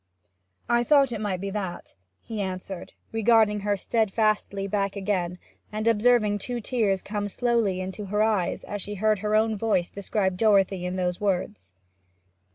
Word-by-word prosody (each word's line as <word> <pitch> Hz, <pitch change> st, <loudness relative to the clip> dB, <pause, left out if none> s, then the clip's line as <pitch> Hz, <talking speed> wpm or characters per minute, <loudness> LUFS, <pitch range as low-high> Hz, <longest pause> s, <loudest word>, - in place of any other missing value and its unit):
'I 240 Hz, 0 st, +3 dB
thought 275 Hz, -1 st, +4 dB
it 220 Hz, -3 st, -4 dB
might 195 Hz, -4 st, -1 dB
be 195 Hz, 0 st, -3 dB
that,' 190 Hz, -4 st, -5 dB, 0.3 s
he 220 Hz, -3 st, -5 dB
answered, 185 Hz, -1 st, -5 dB, 0.2 s
regarding 225 Hz, -1 st, +3 dB
her 205 Hz, 0 st, 0 dB
steadfastly 215 Hz, -2 st, 0 dB
back 200 Hz, 0 st, -1 dB
again, 185 Hz, -3 st, -1 dB, 0.3 s
and 215 Hz, +1 st, -2 dB
observing 220 Hz, -2 st, +3 dB
two 245 Hz, +4 st, -3 dB
tears 210 Hz, -5 st, 0 dB
come 205 Hz, 0 st, -3 dB
slowly 225 Hz, -3 st, 0 dB
into 190 Hz, +3 st, -5 dB
her 210 Hz, +2 st, +1 dB
eyes 215 Hz, -5 st, 0 dB
as 205 Hz, -1 st, -5 dB
she 205 Hz, +2 st, -4 dB
heard 215 Hz, +1 st, +2 dB
her 210 Hz, +1 st, 0 dB
own 220 Hz, 0 st, +3 dB
voice 205 Hz, -5 st, 0 dB
describe 195 Hz, -2 st, -1 dB
Dorothy 195 Hz, -3 st, +3 dB
in 180 Hz, -, -3 dB
those 180 Hz, 0 st, -2 dB
words. 195 Hz, -, -2 dB
205 Hz, 160 wpm, -26 LUFS, 190-220 Hz, 0.3 s, thought